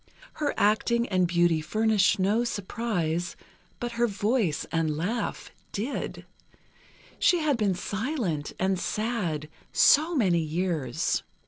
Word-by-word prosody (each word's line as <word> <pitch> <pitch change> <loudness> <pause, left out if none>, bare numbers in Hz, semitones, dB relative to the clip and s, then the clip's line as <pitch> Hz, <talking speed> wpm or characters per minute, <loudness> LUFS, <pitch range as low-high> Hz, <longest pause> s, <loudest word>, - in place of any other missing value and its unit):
Her 290 - 0
acting 235 +3 +2
and 185 -2 +2
beauty 170 -2 +2
furnished 215 +4 +2
no 205 +5 +2
surprise, 185 -6 -2 0.4
but 240 0 -3
her 235 0 +1
voice 205 - 0
and 160 -2 0
laugh 205 +7 -3 0.2
did; 230 +8 -4 0.9
she 355 - +4
had 305 -4 +1
been 205 -5 +1
silent, 205 - -2
and 190 0 0
sad, 195 -9 -2 0.2
so 320 +4 +5
many 185 - +3
years. 160 -5 -1
200 Hz, 115 wpm, -27 LUFS, 170-235 Hz, 0.9 s, so